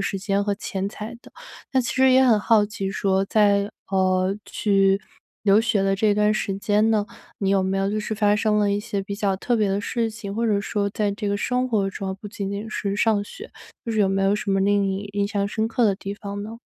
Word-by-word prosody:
时 195 0 -2
间 200 +1 0
和 205 0 0
钱 195 -1 -4
财 215 +3 -8
的。 - - -16 0.4
那 260 - +3
其 240 - -3
实 260 0 +5
也 260 +1 +6
很 230 -4 +5
好 215 -1 +4
奇 195 -2 -4
说 195 0 +1
在， 205 0 +2 0.2
啊， 195 - -2 0.5
去 195 -1 +2 0.4
留 200 0 +5
学 220 -3 +1
的 195 0 +2
这 210 +1 +3
段 210 +1 +2
时 195 - -2
间 210 +2 +2
呢， 210 -2 +1 0.3
你 195 - -1
有 195 -1 +3
没 190 +1 -1
有 195 - 0
就 215 - -1
是 215 +1 -3
发 205 -1 +3
生 210 -1 +1
了 205 -1 +2
一 200 - +1
些 210 -2 -3
比 200 +1 -5
较 200 -2 0
特 240 +4 0
别 210 -2 +1
的 200 +1 0
事 230 +1 -1
情？ 215 -2 -7
或 230 - -1
者 205 -2 +2
说 200 0 -2
在 210 0 -1
这 205 0 -5
个 200 - 0
生 250 +4 0
活 205 -4 +1
中 195 0 -5
哦， 190 - -5
不 210 - -8
仅 200 -2 -5
仅 205 +2 -5
是 200 -2 -3
上 215 -2 +2
学， 435 - -11 0.4
就 - - -2
是 220 - +1
有 195 - +4
没 195 0 0
有 195 +1 +3
什 210 -1 -3
么 195 0 +2
令 200 +1 +3
你 195 +1 -2
印 200 0 +1
象 200 -1 -1
深 220 +1 -1
刻 235 +2 -1
的 200 - +2
地 195 +1 -6
方 205 0 -6
呢？ 225 +2 -8
205 Hz, 275 characters per minute, -23 LUFS, 195-215 Hz, 0.5 s, 也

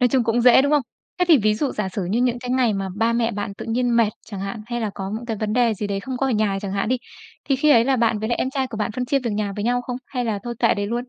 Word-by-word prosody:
Nói 250 - +4
chung 255 -2 +2
cũng 235 +2 +1
dễ, 250 +2 +7
đúng 285 - +1
không? 295 -2 +4 0.4
Thế 360 - +3
thì 315 - +7
ví 215 -1 +2
dụ 270 +5 -1
giả 210 -3 -2
sử 190 0 -4
như 205 +7 0
những 245 -1 +1
cái 245 0 -6
ngày 250 -3 +2
mà 195 -1 -2
ba 225 +2 +2
mẹ 235 0 +1
bạn 205 -1 -4
tự - - -8
nhiên 240 +1 +1
mệt 230 -2 +4 0.2
chẳng 200 -3 -7
hạn, 200 +3 -5
hay 240 0 -3
là 215 -2 -1
có 195 0 -5
những 235 +2 -6
cái 225 - -2
vấn 210 0 -2
đề 235 -1 +3
gì 210 - -4
đấy 200 -1 -2
không 260 +4 -5
có 270 +2 0
ở - - 0
nhà 210 -4 +1
chẳng 200 -2 -4
hạn 195 +1 -1
đi, 255 - +2 0.5
thì 270 - +1
khi 300 +3 +3
ấy 235 -3 +6
là 265 0 +2
bạn 230 -2 +2
với 220 +2 -3
lại 240 - 0
em 260 - 0
trai 270 -1 -1
của 235 -3 -8
bạn 210 0 -1
phân 250 +2 -2
chia 275 +3 +1
việc 245 -3 -3
nhà 205 -1 -2
với 205 - -3
nhau 245 +1 +1
không? 245 0 -4
Hay 250 -3 -3
là 220 -3 -1
thôi 240 0 -5
kệ 230 - +3
đấy 205 -1 -2
luôn? 225 - -2
235 Hz, 350 wpm, -22 LUFS, 210-250 Hz, 0.5 s, dễ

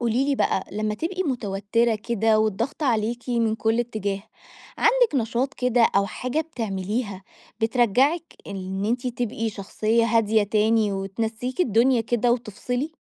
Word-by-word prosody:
قولي 240 +2 +1
لي 280 0 +1
بقى، 190 - 0
لمّا 215 +1 -1
تبقي 360 - -2
مُتَوتِّرة 230 - 0
كده 220 0 +1
والضغط 220 +8 -1
عليكِ 235 -1 0
من 230 -3 +1
كل 225 +1 +1
اتجاه، 205 -4 -3 0.6
عندك - - +3
نشاط 245 +2 0
كده 250 -1 +2
أو 200 0 +3
حاجة 255 +9 -2
بتعمليها، 210 - -3 0.4
بترجّعك 255 - +2
إن 190 0 -4
أنتِ 240 +4 -1
تبقي 230 -2 -2
شخصية 215 +3 0
هادية 225 -1 +3
تاني، 215 +1 +2
وتنسّيكِ 225 - -3
الدنيا 240 - +3
كده 240 +1 +1
وتفصلي؟ 245 +4 -3
230 Hz, 135 wpm, -24 LUFS, 210-250 Hz, 0.6 s, عندك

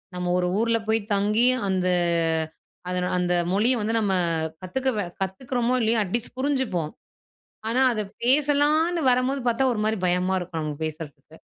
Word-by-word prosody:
நம்ம 180 0 -2
1 180 - 0
ஊர்ல 230 0 +2
போய் 220 +1 +2
தங்கி, 210 +4 +2 0.2
அந்த 185 -1 0 1.0
அதன் 180 0 -1
அந்த 180 0 +1 0.2
மொழிய 230 +6 +3
வந்து 220 +2 -1
நம்ம 200 -3 0 0.5
கத்துக்கவ 215 +2 -1 0.2
கத்துக்குறோமோ, 240 +6 -1
இல்லையோ 225 0 +2
அட்லீஸ்ட் 235 +6 -3
புரிஞ்சிப்போம். 260 - -1 0.8
ஆனா, 250 +3 +1
அத 215 - -1 0.2
பேசலான்னு 295 +5 +3
வரம்போது 255 +2 +1
பார்த்தா 240 +3 +2
ஒரு 220 - -3
மாரி 220 0 +1
பயமா 180 +1 +1
இருக்கும், 175 -2 -5
நமக்கு 150 0 -4
பேசுறதுக்கு. 155 -1 -8
220 Hz, 140 wpm, -24 LUFS, 180-255 Hz, 1.0 s, மொழிய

